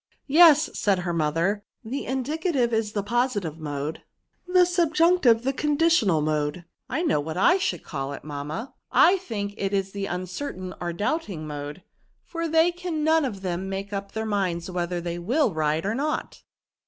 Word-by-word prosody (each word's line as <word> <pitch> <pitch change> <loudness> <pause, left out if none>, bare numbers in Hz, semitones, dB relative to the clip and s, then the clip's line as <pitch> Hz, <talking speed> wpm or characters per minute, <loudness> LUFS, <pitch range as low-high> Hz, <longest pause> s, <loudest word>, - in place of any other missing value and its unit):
" - - -41
Yes," 310 0 +6
said 200 -2 +1
her 175 -1 -2
mother, 165 +6 0 0.2
^< - - -8
the 275 - -3
indicative 265 -1 0
is 220 -1 0
the 205 - -1
positive 205 - -1
mode; 145 0 -4 0.5
the 360 0 +5
subjunctive 330 -7 +3
the 270 +2 0
conditional 295 - +2
mode.'* 150 +2 -1
*' - - -55
I 325 - -1
know 310 - +2
what 160 +3 -4
I 360 - +4
should 380 - -2
call 135 -3 -4
it, - - -8
mamma; 150 - -5 0.2
I - - +6
224f - - +3
VERBS. - - -18
think 205 -3 -3
it 195 0 -2
is 195 0 -1
the 200 0 -3
uncertain 185 +1 -5
or 175 -1 -2
doubting 200 - -2
mode, 145 +3 -6 0.4
for 335 -1 -4
they 325 +2 +4
can 350 -3 -4
none 320 -1 +3
of 205 -7 -5
them 185 +1 -3
make 195 +1 -5
up 200 0 -5
their 220 0 -2
minds 185 -4 -1
whether 175 0 -2
they 170 0 -4
will 235 - +1
ride 155 +2 0
or 205 - 0
not." 295 +5 -3
200 Hz, 190 wpm, -25 LUFS, -, 0.5 s, Yes